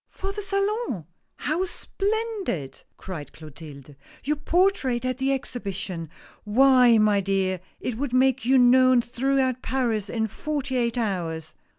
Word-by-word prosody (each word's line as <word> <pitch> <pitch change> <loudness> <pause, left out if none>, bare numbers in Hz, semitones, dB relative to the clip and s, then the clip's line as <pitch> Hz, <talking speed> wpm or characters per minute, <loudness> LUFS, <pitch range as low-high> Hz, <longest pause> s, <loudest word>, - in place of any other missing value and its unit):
" - - -59
For 390 +1 -2
the 415 +1 -5
Salon? 395 - -1 0.3
How 315 +5 -1
splendid 400 - -3
I - - -20
" - - -50
cried 160 -7 -7
Clotilde. 150 -2 -12 0.2
" - - -23
Your 300 +3 0
portrait 300 -7 +1
at 255 0 -2
the 270 +1 +1
Exposition 195 - -4
I - - -22
Why, 250 +1 +5
my 210 -2 +3
dear, 190 -1 0 0.2
it 240 -3 -4
would 280 -2 -2
make 260 0 +3
you 260 +3 +4
known 255 0 +5
throughout 260 +1 0
Paris 230 -6 -1
in 225 -2 -1
forty 280 - -3
eight 240 -1 0
hours." 165 -8 -3
250 Hz, 160 wpm, -25 LUFS, 195-275 Hz, 0.3 s, Why